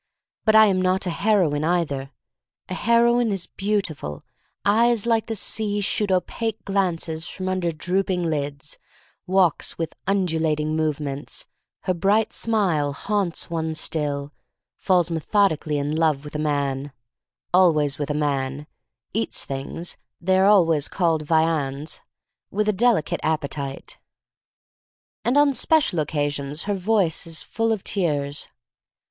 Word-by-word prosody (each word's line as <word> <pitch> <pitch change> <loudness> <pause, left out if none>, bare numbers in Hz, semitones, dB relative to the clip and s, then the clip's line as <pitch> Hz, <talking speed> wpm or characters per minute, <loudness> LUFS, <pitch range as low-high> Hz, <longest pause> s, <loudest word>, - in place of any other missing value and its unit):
But 220 0 +4
I 220 0 +9
am 190 -3 +2
not 185 +1 +1
a 180 - -1
heroine, 175 -7 +2
either. 155 -5 0 0.6
A - - -3
heroine 235 +2 +3
is 195 -3 -1
beautiful 190 - -2 0.2
— - - -48
eyes 230 +2 +3
like 230 -2 +1
the 225 - -3
sea 205 0 0
shoot 205 0 0
opaque 215 +3 -1
glances 175 -4 -1
from 185 +1 -5
under 185 -2 0
drooping 180 +2 -1
lids 145 -2 -2 0.2
— - - -33
walks 185 -3 +2
with 165 -1 -3
undulating 160 -5 0
movements, 150 -3 -3 0.4
her 185 - 0
bright 200 +5 +2
smile 180 -11 +1
haunts 195 +1 -2
one 160 -1 -2
still, 145 -2 -2 0.4
falls 175 -3 +1
methodically 160 -2 +1
in 145 +2 -1
love 155 -3 +1
with 150 - -9
a 150 - -3
man 140 -2 -1 0.3
— - - -59
always 155 -6 +3
with 145 - -2
a 150 - -1
man, 140 -1 -1 0.5
eats 225 +2 -1
things 140 +5 -5 0.2
(they 185 +2 +2
are 190 - +5
always 165 -8 +4
called 165 -4 +1
"viands'*) 155 -2 0 0.5
with 210 +2 -1
a 215 - +3
delicate 220 -5 +2
appetite, 140 -3 -3 1.2
and 245 +4 +2
on 290 -1 +5
special 275 - +2
occa 145 -1 -1
sions 145 +2 -4
her 205 - -1
voice 190 -4 0
is 160 -1 -4
full 225 0 -1
of 215 -4 -1
tears. 145 -7 -1
170 Hz, 140 wpm, -23 LUFS, 150-200 Hz, 1.2 s, I